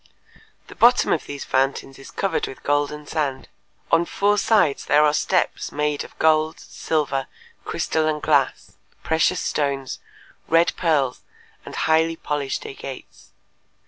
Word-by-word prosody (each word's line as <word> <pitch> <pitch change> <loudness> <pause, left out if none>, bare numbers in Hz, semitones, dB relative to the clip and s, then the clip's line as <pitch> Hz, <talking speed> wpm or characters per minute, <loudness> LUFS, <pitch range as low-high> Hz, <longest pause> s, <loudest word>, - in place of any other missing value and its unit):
The - - -12
bottom 245 +1 +4
of 155 - -3
these 145 -1 -6
fountains 135 0 -1
is 135 - -12
covered 195 - -1
with 135 - -10
golden 145 +1 -1
sand. 145 -4 -3 0.4
On 165 +1 +5
four 205 +4 +1
sides 200 -10 +2
there 150 +1 +4
are 150 - +3
steps - - 0
made 150 0 -1
of - - -14
gold, 155 0 +2
silver, 140 -4 -2 0.4
crystal 160 -1 -1
and 155 -1 0
glass, - - 0 0.3
precious 160 +3 +1
stones, 140 -3 -2 0.5
red 165 +1 +3
pearls, 145 -7 +1 0.5
and - - -7
highly 160 +1 +2
polished 145 -4 -3
agates. 135 -1 -10
150 Hz, 135 wpm, -22 LUFS, 140-160 Hz, 0.5 s, On